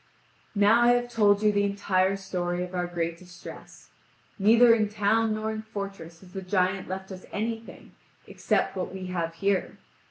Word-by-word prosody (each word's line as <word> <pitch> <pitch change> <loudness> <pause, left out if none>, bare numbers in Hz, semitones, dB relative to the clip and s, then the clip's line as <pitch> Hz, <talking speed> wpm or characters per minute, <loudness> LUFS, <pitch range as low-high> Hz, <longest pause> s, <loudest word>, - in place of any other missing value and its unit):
Now 210 +3 +5
I 240 0 +6
have 245 0 -1
told 205 -2 +3
you 210 - +5
the 205 0 +1
entire 195 -1 +1
story 180 -2 -3
of 180 0 -8
our 180 -1 -1
great 170 -1 -3
distress. 180 -1 -12 0.5
Neither 230 +4 +6
in 215 -2 +1
town 215 +1 +1
nor 215 0 -2
in 215 0 -4
fortress 195 -6 -7
has 185 -1 -16
the 190 - -5
giant 185 0 0
left 190 +1 -6
us 185 -1 -10
anything, 225 +1 -5 0.3
except - - -1
what 185 - -3
we 190 0 -7
have 165 -2 -2
here. 195 +2 -1
195 Hz, 170 wpm, -27 LUFS, 180-215 Hz, 0.5 s, I